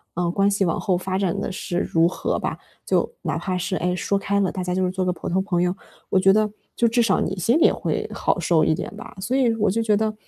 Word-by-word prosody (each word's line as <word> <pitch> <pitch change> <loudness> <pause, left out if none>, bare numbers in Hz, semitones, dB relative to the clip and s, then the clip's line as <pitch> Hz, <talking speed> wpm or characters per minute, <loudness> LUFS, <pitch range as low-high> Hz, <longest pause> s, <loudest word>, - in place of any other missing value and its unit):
嗯， 175 0 0
关 200 +1 +3
系 200 -1 +1
往 165 - 0
后 185 -4 0
发 185 +1 -2
展 190 -3 0
得 - - -3
是 180 -1 -4
如 165 -2 +2
何 - - -2
吧， - - -3 0.3
就 - - +1
哪 - - -2
怕 185 -2 -2
是， 185 +2 -2
诶， 180 +1 0
说 200 +2 0
开 200 0 0
了， 190 - +1
大 185 - -4
家 180 0 -2
就 185 - +1
是 180 - -1
做 185 0 -2
个 180 - +1
普 - - -6
通 190 +2 +1
朋 185 -3 0
友， 180 0 +1 0.4
我 190 - +3
觉 195 +1 +5
得 215 0 +2 0.3
就 235 - +3
至 235 +1 +2
少 230 - +2
你 190 - -1
心 230 - +2
里 - - -1
也 - - +5
会 - - -2
好 - - 0
受 165 -3 +3
一 160 - +3
点 - - -6
吧。 - - -10
所 245 +7 -2
以， 245 -4 +3
我 215 -1 +1
就 225 +5 0
觉 215 -2 +2
得， 215 0 0
190 Hz, 305 characters per minute, -23 LUFS, 180-210 Hz, 0.4 s, 觉